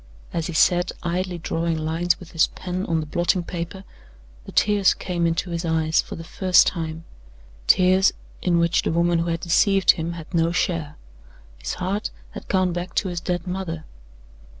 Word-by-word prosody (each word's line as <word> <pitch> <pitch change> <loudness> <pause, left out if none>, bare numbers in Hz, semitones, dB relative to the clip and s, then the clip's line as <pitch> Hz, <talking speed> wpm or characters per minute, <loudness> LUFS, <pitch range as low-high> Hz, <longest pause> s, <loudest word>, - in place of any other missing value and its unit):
As 165 -2 -1
he 170 - -5
sat 175 +2 +3
idly 180 +1 -2
drawing 165 0 -1
lines 165 +3 0
with 180 - -12
his 165 - +3
pen 185 +1 -5
on 165 -1 +1
the - - -5
blotting 175 +3 0
paper, 175 +3 -6 0.6
the - - -9
tears 205 -2 +3
came 175 -2 -1
into 170 +2 -1
his 170 0 -2
eyes 160 -1 +2
for - - -8
the 165 - -8
first 180 +2 +4
time 160 -2 -3 0.6
tears 185 +1 +5 0.3
in 175 -2 +2
which 170 0 +3
the - - -1
woman 170 +1 +2
who 165 - -1
had 165 0 -1
deceived 195 +2 +4
him 170 0 -4
had 165 +1 -10
no 165 0 +2
share. 165 -4 -1 0.6
His - - -4
heart 190 +3 -2 0.2
had - - -9
gone 185 -2 +1
back 175 +1 -5
to 190 - +1
his 175 -1 -3
dead 175 +1 -3
mother. 180 -4 -4
170 Hz, 180 wpm, -23 LUFS, 165-180 Hz, 0.6 s, tears